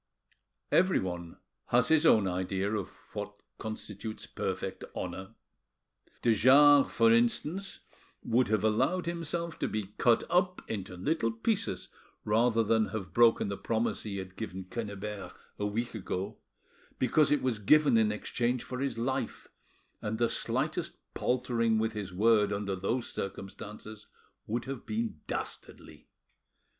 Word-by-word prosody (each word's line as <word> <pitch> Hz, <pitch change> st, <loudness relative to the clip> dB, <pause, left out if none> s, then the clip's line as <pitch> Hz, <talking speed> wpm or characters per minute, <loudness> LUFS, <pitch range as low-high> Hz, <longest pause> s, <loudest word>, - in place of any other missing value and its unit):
Everyone 90 Hz, -, +1 dB, 0.3 s
has 125 Hz, +4 st, +3 dB
his 160 Hz, 0 st, +5 dB
own 105 Hz, -8 st, +5 dB
idea 95 Hz, +2 st, -1 dB
of 105 Hz, -4 st, -1 dB, 0.3 s
what -, -, -6 dB, 0.2 s
constitutes 110 Hz, 0 st, -6 dB
perfect -, -, -4 dB
honour. 95 Hz, +4 st, -5 dB, 0.9 s
De 115 Hz, -, +5 dB
Jars, 140 Hz, +5 st, +7 dB
for 115 Hz, -1 st, +4 dB
instance, 150 Hz, +11 st, 0 dB, 0.4 s
would 125 Hz, +2 st, +2 dB
have 105 Hz, -1 st, +1 dB
allowed 130 Hz, +12 st, +2 dB
himself 170 Hz, 0 st, -3 dB
to -, -, 0 dB
be 105 Hz, -2 st, -4 dB
cut 120 Hz, -2 st, +4 dB
up 180 Hz, +1 st, +1 dB
into 95 Hz, -4 st, -5 dB
little 125 Hz, -, 0 dB
pieces 195 Hz, -, -1 dB, 0.4 s
rather 115 Hz, +2 st, +3 dB
than 110 Hz, 0 st, +2 dB
have 95 Hz, -6 st, -6 dB
broken 115 Hz, +1 st, +5 dB
the 100 Hz, 0 st, -3 dB
promise 115 Hz, 0 st, -1 dB
he 100 Hz, -2 st, -5 dB
had 95 Hz, -1 st, -7 dB
given 95 Hz, -4 st, -5 dB
Quennebert 100 Hz, -2 st, -6 dB, 0.2 s
a 105 Hz, -, 0 dB
week 115 Hz, +4 st, -2 dB
ago, 95 Hz, -2 st, -4 dB, 0.6 s
because 140 Hz, +4 st, +3 dB
it 150 Hz, -, +2 dB
was 125 Hz, -4 st, 0 dB
given 145 Hz, +5 st, +5 dB
in 110 Hz, -2 st, +4 dB
exchange 120 Hz, +3 st, -1 dB
for 125 Hz, -, -6 dB
his 135 Hz, -4 st, -2 dB
life, 130 Hz, +3 st, -2 dB, 0.5 s
and 105 Hz, +1 st, -2 dB
the 120 Hz, 0 st, +2 dB
slightest 155 Hz, +10 st, -1 dB, 0.2 s
paltering 120 Hz, -3 st, +1 dB
with 110 Hz, 0 st, 0 dB
his 100 Hz, -3 st, -5 dB
word 105 Hz, +2 st, +3 dB
under 100 Hz, -1 st, -2 dB
those 115 Hz, +7 st, -1 dB
circumstances 105 Hz, +2 st, -7 dB, 0.4 s
would 115 Hz, +2 st, -2 dB
have 135 Hz, -3 st, -5 dB
been 110 Hz, -7 st, -3 dB
dastardly. -, -, -7 dB
115 Hz, 135 wpm, -30 LUFS, 105-130 Hz, 0.9 s, Jars